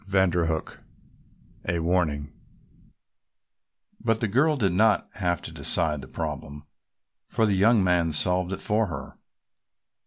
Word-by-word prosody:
CHAPTER 90 -3 +2
XV 80 -1 -3 0.9
A 85 0 +1
WARNING 80 -4 0 1.7
But 115 -1 +1
the 110 - 0
girl 140 +9 +2
did 100 -8 +1
not 105 +4 +3
have 90 -3 -1
to - - -5
decide 75 -4 +1
the 65 - -10
problem, 75 +2 -6 0.6
for 110 - +1
the 105 - +2
young 105 +2 +4
man 90 -3 +2
solved 90 +3 +1
it 95 - -4
for 110 0 +1
her. 80 -6 -8
90 Hz, 130 wpm, -26 LUFS, 80-105 Hz, 1.7 s, young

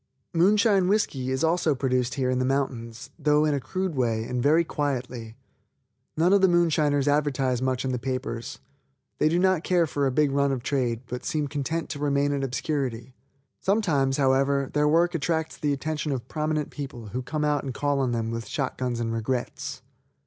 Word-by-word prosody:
Moonshine 195 +2 +4
whisky 150 -11 0
is 130 +2 -1
also 165 -2 +2
produced 125 -2 0
here 130 -2 0
in 130 - 0
the - - +1
mountains, 130 -3 -2
though 150 0 +3
in 150 - +2
a 140 - 0
crude 185 +6 -3
way, 115 -5 0
and 125 +2 -2
very 155 +6 +4
quietly. 125 -7 -3 0.8
None 175 +4 +4
of 200 - +5
the 190 - +6
moonshiners 155 -5 +2
advertise 140 -4 +1
much 130 0 -1
in 130 - 0
the 125 - -2
papers. 130 -2 -4 0.6
They 155 - +4
do 170 - +1
not 185 -2 +2
care 175 -2 +3
for 145 -2 0
a - - 0
big 145 +2 +2
run 140 0 +2
of 130 -3 -3
trade, 120 -5 0
but 125 0 -6
seem 150 -2 -1
content 150 +3 -2
to 145 - -5
remain 145 0 +1
in 140 -1 -1
obscurity. 130 -2 -3 0.5
Sometimes, 160 -10 +1
however, 135 0 +2
their 150 0 +3
work 170 +3 +3
attracts 160 0 -1
the 150 - -1
attention 150 +2 -2
of 125 -3 -3
prominent 155 0 -2
people 125 -6 -7
who 125 +5 -3
come 150 +4 -2
out 150 -1 +1
and 135 - -3
call 145 +2 0
on 130 -2 +1
them 115 -1 -1
with 115 0 -4
shot 135 -3 -3
guns 125 -2 -1
and 115 -1 -2
regrets. 120 +2 -3
140 Hz, 190 wpm, -26 LUFS, 130-155 Hz, 0.8 s, the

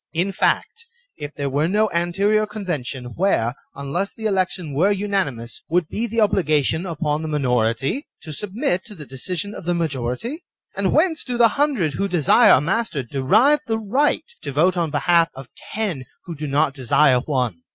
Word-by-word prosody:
In 175 +4 0
fact, 460 - -1 0.3
if 145 +1 -8
there 140 -1 -2
were 145 +3 +1
no 210 +4 +2
anterior 200 +5 +1
convention, 145 - -5
where, 165 - +1 0.2
unless 155 +8 -2
the 220 - -9
election 185 -6 -1
were 180 +9 +3
unanimous, 190 - -2
would 170 -1 +1
be 235 +2 -2
the 230 +1 -6
obliga 175 -9 +3
tion 160 +7 -1
upon 155 -2 -2
the 160 - -4
minority 135 - 0 0.2
to 155 - -7
submit 205 - -2
to 210 - -10
the 150 -4 -8
decision 180 +10 -4
of 185 - -9
the 175 0 0
majority? 160 - -3 0.3
And - - 0
whence 320 -1 +2
do 245 -2 -3
the 235 -1 +6
hundred 255 - 0
who 200 +7 -1
desire 175 -7 +5
a - - +6
master 165 - -1
derive 205 - +3
the 225 -1 0
right 245 +8 +1 0.2
to - - -5
vote 170 +7 +2
on 170 -2 0
behalf 165 +3 +3
of 135 -2 -10 0.3
ten 190 -12 -2 0.2
who 170 - -6
do 150 -1 -5
not 140 +1 +1
desire 135 0 +3
one 125 - -2
170 Hz, 180 wpm, -21 LUFS, 140-205 Hz, 0.3 s, the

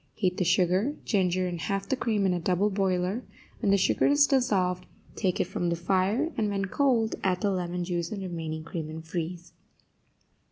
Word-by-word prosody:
Heat 185 -4 0
the - - +1
sugar, 185 - +2
ginger 185 -3 +1
and 175 -2 -4
half 195 +1 -2
the 265 - +1
cream 220 -6 0
in 185 - +2
a 175 - -1
double 185 +4 +1
boiler; 190 +3 0 0.4
when 210 - 0
the 200 - +5
sugar 190 - +2
is 285 0 +5
dissolved, 195 -10 +1 0.3
take 185 -4 0
it - - +4
from 175 -1 -2
the 170 - +1
fire, 195 - +1
and, 215 -2 +1
when 195 -1 -1
cold, 230 0 +1
add 185 -1 +1
the 205 - +2
lemon 180 -1 -2
juice 170 -1 -2
and 200 -3 -4
remaining 160 -3 -4
cream, 160 -1 -5
and 160 +1 -8
freeze. 170 +1 -5
185 Hz, 195 wpm, -28 LUFS, 175-205 Hz, 0.4 s, the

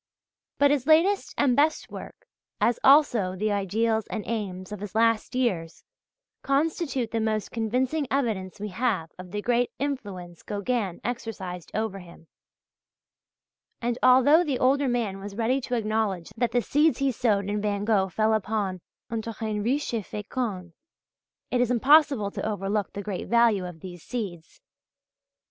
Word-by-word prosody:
But 285 0 +4
his 280 -2 0
latest 350 +6 +3
and 265 -4 +3
best 305 +3 +1
work, - - -10 0.3
as 235 - +2
also 245 -10 +5
the 210 +3 -1
ideals 220 +2 0
and 215 - -4
aims 195 -4 -4
of 210 - -5
his 205 0 -7
last 230 +1 +2
years 180 -11 -1 0.6
constitute 275 -4 0
the 230 - 0
most 215 -2 -1
convincing 255 +6 -1
evidence 215 -8 -1
we 210 +1 -4
have 190 -5 -1
of 185 0 -9
the 205 +2 -4
great 245 0 +2
influence 200 - -5
Gauguin 205 -2 -2
exercised 195 -8 -5
over 215 -3 -2
him, 170 -2 -14 1.5
and 240 0 -2
although 260 +6 +6
the 285 -6 -1
older 275 +2 +2
man 230 -6 -1
was 200 0 -8
ready 240 +4 +1
to 245 - -2
acknowledge 215 -6 -1
that 235 +1 0
the 245 -1 +1
seeds 300 +2 +3
he 275 -1 +1
sowed 210 -5 +1
in 205 0 -1
Van 205 -1 -1
Gogh 200 -4 +2
fell 220 +3 +1
upon 200 -3 -1 0.3
"un 225 -1 -1
terrain 220 -1 -4
riche 260 +5 -1
et 230 - 0
fécond," 210 -4 -4 0.8
it 250 - +2
is 245 - +2
impossible 265 -3 +4
to - - -5
overlook 205 -1 -2
the 200 - -5
great 195 -2 -4
value 230 -6 +3
of 165 -3 -10
these 175 -2 -9
seeds. 185 -9 -6
220 Hz, 155 wpm, -26 LUFS, 200-250 Hz, 1.5 s, although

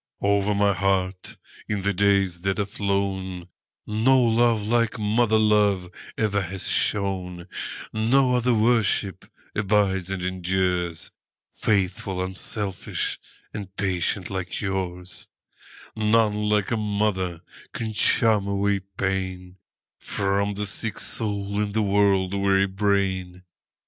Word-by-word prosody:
Over 100 0 +2
my 100 0 +3
heart, 95 0 -1 0.3
in 100 -2 -1
the 100 0 +1
days 100 -2 +2
that 95 +1 0
are 105 - 0
flown, 95 -3 -2 0.4
No 115 +5 +3
love 115 -2 +3
like 115 +1 +1
mother 110 +1 +2
love 105 -4 +2 0.3
ever 100 -2 +1
has 95 +1 -4
shone; 95 -3 -1 0.5
No 125 +4 +3
other 125 0 +2
worship 110 -4 +2 0.3
abides 100 -3 +1
and 95 -2 -3
endures,—Faithful, 90 +1 -2
unselfish, 95 +1 -2 0.3
and 100 -3 -7
patient 95 -1 -1
like 90 -2 -4
yours:None 105 +3 -2
like 105 0 +1
a 115 - +1
mother 100 -5 -1 0.3
can 110 -2 -4
charm 110 -1 +3
away 100 0 +1 0.2
painFrom 95 +1 -3
the 105 +1 -2
sick 105 +1 -2
soul 100 -2 -1
and 105 0 -3
the 110 - +2
world 100 -2 +2
weary 100 0 +3
brain. 95 -2 -1
100 Hz, 110 wpm, -24 LUFS, 95-105 Hz, 0.5 s, my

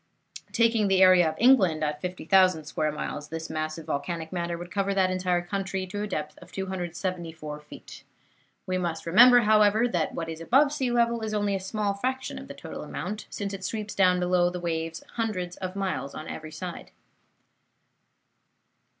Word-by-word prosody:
Taking 230 -2 +3
the 190 -1 +5
area 180 -3 +6
of - - -6
England 195 -11 +4
at 150 -1 -2
50,000 180 -2 +2
square 155 0 -1
miles, 150 0 -5
this 165 0 -5
mass 155 0 -3
of 165 - -9
volcanic 160 +3 -3
matter 170 -1 -2
would 175 +1 -9
cover 200 -1 0
that 185 -1 +3
entire 180 -1 0
country 195 +1 -3
to 205 +3 -5
a 210 - -2
depth 150 -5 -4
of - - -15
274 175 -4 -4
feet. 150 - -12 0.6
We 185 0 -1
must 170 -2 -3
remember, 245 +8 +7
however, 215 +1 +4
that 175 -7 -1
what 165 - -3
is 160 0 -6
above 275 - +4
sea 265 -4 -1
level 235 -1 +2
is 215 -1 -3
only 205 -1 0
a 195 - 0
small 200 +1 -2
fraction 260 +6 -3
of - - -10
the - - -9
total - - -8
amount, 210 +1 -5
since 200 -1 -4
it 195 -1 -6
sweeps 210 +1 -4
down 180 -2 +4
below 180 0 +2
the 180 0 -5
waves 165 -1 -3
hundreds 185 -6 -2
of 185 0 -5
miles 185 -9 -3
on 155 - -7
every 155 0 -7
side. 175 +3 -7
185 Hz, 180 wpm, -27 LUFS, 165-205 Hz, 0.6 s, remember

